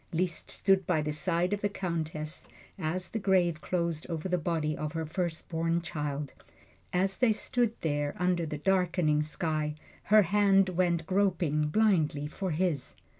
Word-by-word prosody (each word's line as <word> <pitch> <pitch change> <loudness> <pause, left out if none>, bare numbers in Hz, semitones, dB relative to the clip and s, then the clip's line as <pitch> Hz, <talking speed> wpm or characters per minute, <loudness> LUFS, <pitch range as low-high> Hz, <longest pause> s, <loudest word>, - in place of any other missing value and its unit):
Liszt 175 +1 -2
stood 195 -2 +2
by 160 -4 +2
the 150 - -1
side 170 +4 0
of 205 - -2
the 205 - +1
Countess 160 -5 -4 0.3
as 180 +2 -2
the 225 - -2
grave 180 -5 +2
closed 170 -3 -2
over 165 +1 -3
the 180 -1 0
body 155 -2 -1
of 150 +1 -4
her 165 -1 -2
firstborn 165 0 -1
child. 150 -4 -4 0.6
And 180 +1 +2
as 195 0 -1
they 250 -3 +4
stood 235 +1 0
there, 145 -2 -1
under 180 -2 +1
the 150 - -4
darkening 175 -3 +2
sky, 155 0 -2 0.3
her 215 0 +6
hand 195 0 +4
went 175 -2 +1
groping 175 -6 +1
blindly 155 -6 +2
for 185 +5 -4
his. 160 -5 -1
170 Hz, 160 wpm, -30 LUFS, 155-185 Hz, 0.6 s, her